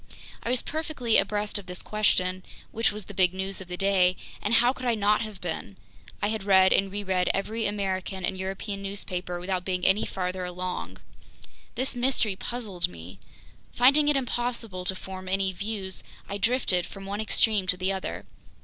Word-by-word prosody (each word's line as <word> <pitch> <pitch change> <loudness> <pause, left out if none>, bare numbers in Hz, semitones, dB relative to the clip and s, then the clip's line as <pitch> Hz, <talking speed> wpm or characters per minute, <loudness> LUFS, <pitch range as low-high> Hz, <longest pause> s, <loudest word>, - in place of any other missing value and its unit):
I - - -3
was 250 0 +3
perfectly 300 -7 0
abreast 205 +1 +1
of 195 - -12
this 180 -1 -5
question, 185 -3 +1 0.3
which 225 0 +2
was 210 -1 -6
the 205 - -9
big 185 -1 +3
news 190 +1 -3
of 185 - -8
the 180 0 -5
day, 185 -2 +3 0.2
and 210 +3 +2
how 240 +2 +5
could 255 -1 -5
I 235 - +3
not 210 0 +3
have 215 -4 -5
been? 160 - -4 0.5
I 205 - +3
had 220 -1 -1
read 190 -1 +6
and 195 0 +2
reread 190 -3 0
every 220 +3 -1
American 190 -2 -2
and 190 - -1
European 195 +2 -4
newspaper 185 -3 -3
without 180 0 -2
being 185 -1 -1
any 195 +3 +4
farther 185 0 -2
along. 180 0 -4 0.8
This 260 +1 -1
mystery 240 -5 +2
puzzled 205 -5 -2
me. 85 +1 -11 0.5
Finding 280 +5 +6
it 295 -1 +4
impossible 240 -7 -2
to 190 - 0
form 185 0 -7
any 190 0 +1
views, 200 0 -4 0.3
I 200 0 -4
drifted 200 -5 +2
from 195 0 -9
one 200 +2 -3
extreme 215 -2 +2
to 180 - +2
the 185 +1 0
other. 190 - -4
195 Hz, 180 wpm, -27 LUFS, 185-220 Hz, 0.8 s, read